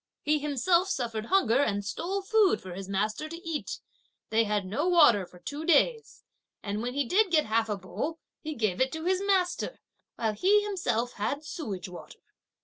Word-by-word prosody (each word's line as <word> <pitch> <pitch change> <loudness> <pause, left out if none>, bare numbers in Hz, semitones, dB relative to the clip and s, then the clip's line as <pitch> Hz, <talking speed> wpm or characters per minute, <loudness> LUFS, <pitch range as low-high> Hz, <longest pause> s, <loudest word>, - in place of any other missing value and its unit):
He 300 0 +2
himself 300 +6 +2
suffered 230 - -2
hunger 270 - +3
and 205 -7 0
stole 370 - -3
food 425 -1 +3
for 185 -1 -9
his 195 +1 -7
master 215 +9 -1
to 335 +1 -9
eat; 320 -3 -3 0.5
they 225 +1 +3
had 210 -2 -1
no 265 - -1
water 235 - +5
for 180 - -16
two 285 - -6
days; 445 +9 +2 0.4
and 205 +1 -3
when 245 +2 -3
he 285 -1 +1
did 390 - +3
get 315 -3 +3
half 225 +1 +1
a 210 - -1
bowl, 285 - -4 0.2
he 310 -1 -5
gave 215 -4 0
it 260 - +2
to 320 +1 -5
his 370 +1 +1
master, 385 +3 0 0.4
while 220 -2 -1
he 400 - +3
himself 245 - -1
had 280 +9 -3
sewage 215 - -5
water. 180 -1 -11
280 Hz, 185 wpm, -28 LUFS, 215-350 Hz, 0.5 s, water